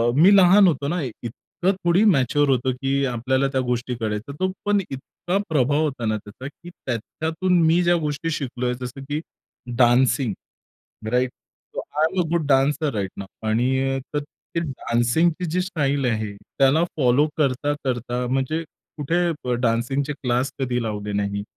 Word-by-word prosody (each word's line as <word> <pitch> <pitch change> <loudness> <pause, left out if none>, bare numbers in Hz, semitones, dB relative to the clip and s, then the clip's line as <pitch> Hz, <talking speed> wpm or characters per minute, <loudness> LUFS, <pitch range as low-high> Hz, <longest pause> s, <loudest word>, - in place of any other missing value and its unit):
मी 180 +8 +7
लहान 195 +1 +7
होतो 140 -4 0
ना 175 +3 -1
एक 130 -6 -4
इतकं 175 - -2
थोडी 175 +4 +4
मॅच्युर 145 - +3
होतो, 130 0 +2
की 135 +2 0
आपल्याला 130 +2 0
त्या 130 -1 +1
गोष्टी 125 0 -1
कळायच्या. 110 +5 -3
तो 185 0 +1
पण 205 0 +3
इतका 140 +7 -4
प्रभाव 145 0 +2
होता 135 -6 -2
ना 110 0 +1
त्याचा, 105 +5 -10
की 170 +4 -12
त्याच्यातून 160 +6 -2
मी 170 +2 +4
ज्या 175 0 +4
गोष्टी 150 +1 -2
शिकलोय, 125 -4 -2
जसं 125 +2 -6
की 145 +1 -1 0.6
dancing, 120 -1 +3 0.8
right? 125 0 +2 0.4
So, - - -2 0.2
I - - +5
am 190 - 0
a - - -4
good 170 -3 +1
dancer 140 +2 +2
right 100 -3 -2
नॉउ. 100 - -6 0.2
आणि 130 +4 +1 0.2
तर 145 - +2 0.4
ते 165 - +1
डान्सिंगची 155 +4 0
जी 180 +3 +1
स्टाईल 145 -7 -1
आहे, 110 -3 -1 0.3
त्याला 140 +4 +4
फॉलो 135 0 +3
करता-करता, 130 -3 -1
म्हणजे 135 +6 -1 0.3
कुठे 165 +4 0 0.2
ब, 125 - -1
डान्सिंगचे 125 +5 0
क्लास 125 -1 -1
कधी 125 -2 -1
लावले 105 -2 -4
नाही, 100 0 -1
135 Hz, 160 wpm, -23 LUFS, 120-155 Hz, 0.8 s, मी